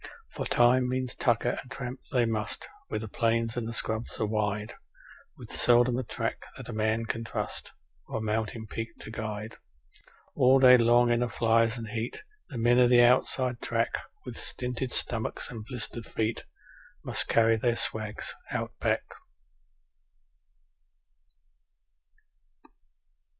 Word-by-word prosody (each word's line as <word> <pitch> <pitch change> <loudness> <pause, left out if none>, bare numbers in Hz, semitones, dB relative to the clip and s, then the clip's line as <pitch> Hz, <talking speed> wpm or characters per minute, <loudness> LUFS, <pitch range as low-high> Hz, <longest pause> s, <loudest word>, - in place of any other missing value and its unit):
_For - - -3
time 125 +1 +4
means 130 -1 -1
tucker, 120 0 +1
and 125 - -16
tramp 130 -1 -6
they 125 -4 +3
must, 110 -2 -2 0.2
where 110 - -2
the 110 - -6
plains 115 +1 0
and 115 -1 -3
scrubs 110 +1 -3
are 110 - +1
wide, 105 0 -1 0.6
With - - -11
seldom 120 0 +4
a - - -2
track - - -3 0.2
that - - -9
a - - -6
man 110 +1 0
can 115 0 -3
trust, 115 - -5 0.4
or - - -3
a - - -3
mountain 110 +1 -2
peak 115 +1 -6
to - - -8
guide; 110 0 -5 0.8
All 130 +1 +5
day 130 -1 +8
long 120 0 +5
in 120 - +3
the 120 0 0
flies 115 +1 +2
and 115 -1 -6
heat 115 - -4 0.3
the 130 - -6
men 120 +2 +4
of 125 -1 +6
the 120 -1 +7
outside 125 0 +2
track 115 0 0 0.4
With - - -7
stinted 125 0 -3
stomachs 110 -2 -2
and 115 -3 -7
blistered 120 -1 -5
feet 110 +1 -2 0.6
must - - 0
carry 115 0 +4
their 120 +1 +1
swags 110 -2 -3 0.2
Out - - -2
Back. - - +1
115 Hz, 145 wpm, -29 LUFS, 110-125 Hz, 0.8 s, day